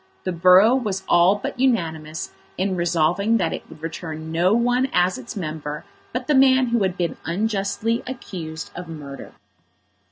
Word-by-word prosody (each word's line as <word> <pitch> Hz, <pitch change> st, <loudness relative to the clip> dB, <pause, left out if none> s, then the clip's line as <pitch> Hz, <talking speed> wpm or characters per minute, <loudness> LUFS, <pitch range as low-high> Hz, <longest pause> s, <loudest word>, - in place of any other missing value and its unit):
The 185 Hz, -, -1 dB
borough 185 Hz, +6 st, +6 dB
was 205 Hz, -7 st, -2 dB
all 175 Hz, +3 st, +5 dB
but 205 Hz, +4 st, -5 dB
unanimous 160 Hz, -11 st, -1 dB, 0.3 s
in 190 Hz, +1 st, 0 dB
resolving 175 Hz, +5 st, +2 dB
that 195 Hz, -, 0 dB
it -, -, -7 dB
would 160 Hz, 0 st, -14 dB
return 160 Hz, -1 st, -6 dB
no 175 Hz, +3 st, +2 dB
one 245 Hz, +3 st, +2 dB
as 180 Hz, -3 st, +2 dB
its 120 Hz, -, -8 dB
member 155 Hz, -4 st, -5 dB, 0.3 s
but 250 Hz, +1 st, -3 dB
the 300 Hz, -, +1 dB
man 260 Hz, -2 st, +5 dB
who 235 Hz, -1 st, +1 dB
had 190 Hz, -1 st, 0 dB
been 175 Hz, -2 st, -2 dB
unjustly 210 Hz, +4 st, -1 dB
accused 170 Hz, -11 st, -6 dB
of 175 Hz, 0 st, -7 dB
murder. 145 Hz, -4 st, -9 dB
185 Hz, 160 wpm, -22 LUFS, 160-225 Hz, 0.3 s, borough